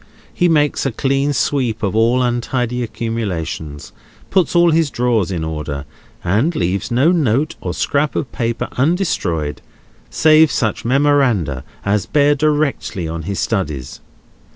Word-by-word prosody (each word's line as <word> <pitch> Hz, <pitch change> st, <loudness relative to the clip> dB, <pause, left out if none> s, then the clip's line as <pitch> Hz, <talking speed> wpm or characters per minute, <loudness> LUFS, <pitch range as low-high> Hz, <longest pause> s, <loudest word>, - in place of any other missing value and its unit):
He 175 Hz, -1 st, +2 dB
makes 150 Hz, -3 st, +2 dB
a 135 Hz, -, 0 dB
clean 135 Hz, +4 st, 0 dB
sweep 120 Hz, -3 st, -1 dB
of 100 Hz, +1 st, -1 dB
all 120 Hz, +3 st, +3 dB
untidy 125 Hz, 0 st, -1 dB
accumulations, 100 Hz, -11 st, -4 dB, 0.4 s
puts 185 Hz, -2 st, +2 dB
all 170 Hz, 0 st, +5 dB
his 160 Hz, -1 st, +2 dB
drawers 120 Hz, -7 st, 0 dB
in 85 Hz, -4 st, -3 dB
order, 75 Hz, -3 st, -4 dB, 0.4 s
and 110 Hz, -, +1 dB
leaves 90 Hz, +2 st, -1 dB
no 130 Hz, +8 st, +3 dB
note 150 Hz, -3 st, +1 dB
or -, -, -3 dB
scrap 145 Hz, +1 st, 0 dB
of 125 Hz, -, -2 dB
paper 115 Hz, -1 st, -2 dB
undestroyed, 115 Hz, -, 0 dB, 0.5 s
save 155 Hz, 0 st, +5 dB
such 110 Hz, -7 st, -1 dB
memoranda 125 Hz, -, +2 dB, 0.2 s
as 100 Hz, 0 st, 0 dB
bear 145 Hz, 0 st, +3 dB
directly 145 Hz, -, 0 dB
on 80 Hz, +1 st, -4 dB
his 100 Hz, -, -2 dB
studies. 85 Hz, -, -3 dB
120 Hz, 135 wpm, -18 LUFS, 95-145 Hz, 0.5 s, all